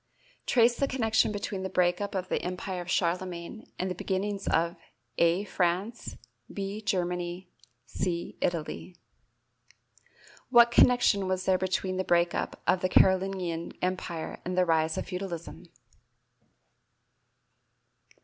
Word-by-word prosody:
Trace 240 Hz, -1 st, +4 dB
the 275 Hz, -, +1 dB
connection 225 Hz, -5 st, +2 dB
between 205 Hz, -1 st, -4 dB
the 190 Hz, -, -3 dB
break 180 Hz, 0 st, +2 dB
up 200 Hz, -1 st, -3 dB
of 185 Hz, -1 st, -2 dB
the -, -, -1 dB
Empire 180 Hz, +1 st, -4 dB
of 175 Hz, -, -9 dB
Charlemagne 180 Hz, +3 st, -2 dB
and 185 Hz, -, -1 dB
the 185 Hz, -, -2 dB
beginnings 195 Hz, +2 st, -3 dB
of 170 Hz, +1 st, +1 dB, 0.4 s
(a) 170 Hz, +3 st, +3 dB
France, 190 Hz, +4 st, -2 dB, 0.3 s
(b) 200 Hz, +2 st, -4 dB
Germany, 180 Hz, -2 st, -2 dB, 0.3 s
(c) 170 Hz, -2 st, -3 dB
Italy. 175 Hz, +1 st, -3 dB, 1.5 s
What 240 Hz, -1 st, +7 dB
connection 240 Hz, -6 st, +4 dB
was 185 Hz, 0 st, -1 dB
there 185 Hz, -1 st, +3 dB
between 185 Hz, 0 st, -1 dB
the 190 Hz, -, 0 dB
break 175 Hz, -1 st, +2 dB
up -, -, -3 dB
of 185 Hz, -, +2 dB
the 185 Hz, -, +1 dB
Carolingian 185 Hz, -3 st, +2 dB
Empire 180 Hz, -3 st, -3 dB
and 180 Hz, +1 st, -3 dB
the 185 Hz, -, +4 dB
rise 160 Hz, -1 st, +1 dB
of -, -, -2 dB
feudalism? 180 Hz, -, -6 dB
185 Hz, 130 wpm, -28 LUFS, 175-200 Hz, 1.5 s, What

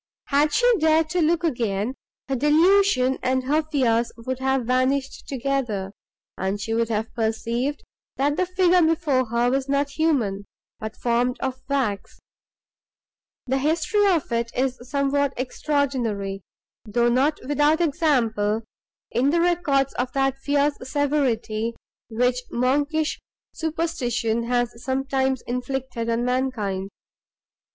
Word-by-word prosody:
Had 295 Hz, +2 st, +3 dB
she 485 Hz, -, +2 dB
dared 315 Hz, 0 st, +3 dB
to 360 Hz, -, +1 dB
look 335 Hz, +2 st, +2 dB
again, 230 Hz, -, -1 dB, 0.3 s
her 270 Hz, -, -1 dB
delusion 295 Hz, -1 st, +3 dB
and 260 Hz, 0 st, +1 dB
her 295 Hz, +4 st, +2 dB
fears 245 Hz, -7 st, +1 dB
would 255 Hz, +2 st, -4 dB
have 265 Hz, -2 st, 0 dB
vanished 260 Hz, +2 st, 0 dB
together, 245 Hz, -7 st, -2 dB, 0.5 s
and 190 Hz, +2 st, -1 dB
she 225 Hz, +2 st, -3 dB
would 230 Hz, 0 st, +1 dB
have 220 Hz, 0 st, -2 dB
perceived, 235 Hz, +5 st, -2 dB, 0.3 s
that 285 Hz, +2 st, +1 dB
the 365 Hz, +2 st, 0 dB
figure 365 Hz, -1 st, +3 dB
before 315 Hz, -6 st, +2 dB
her 235 Hz, +2 st, +1 dB
was 270 Hz, +1 st, -1 dB
not 280 Hz, 0 st, +1 dB
human, 255 Hz, -11 st, 0 dB, 0.3 s
but 220 Hz, 0 st, -6 dB
formed 245 Hz, +1 st, 0 dB
of 260 Hz, -1 st, -3 dB
wax. 230 Hz, -9 st, -1 dB, 1.3 s
The 265 Hz, +1 st, 0 dB
history 320 Hz, +8 st, +2 dB
of 335 Hz, -9 st, +1 dB
it 235 Hz, 0 st, -1 dB
is 255 Hz, 0 st, 0 dB
somewhat 280 Hz, 0 st, +1 dB
extraordinary, 250 Hz, -7 st, -1 dB, 0.4 s
though 235 Hz, +2 st, +1 dB
not 275 Hz, +5 st, +2 dB
without 295 Hz, +2 st, +3 dB
example 245 Hz, -10 st, +1 dB, 0.5 s
in 260 Hz, +3 st, +2 dB
the 340 Hz, +3 st, +2 dB
records 335 Hz, -6 st, +2 dB
of 250 Hz, 0 st, -1 dB
that 270 Hz, -1 st, +1 dB
fierce 285 Hz, +1 st, +1 dB
severity, 255 Hz, -5 st, -1 dB, 0.3 s
which 250 Hz, +2 st, +1 dB
monkish 290 Hz, +5 st, 0 dB, 0.3 s
superstition 250 Hz, -8 st, -1 dB
has 240 Hz, -1 st, -1 dB
sometimes 265 Hz, 0 st, 0 dB
inflicted 250 Hz, -1 st, -3 dB
on 230 Hz, +1 st, 0 dB
mankind. 230 Hz, -7 st, -1 dB
265 Hz, 125 wpm, -24 LUFS, 235-295 Hz, 1.3 s, Had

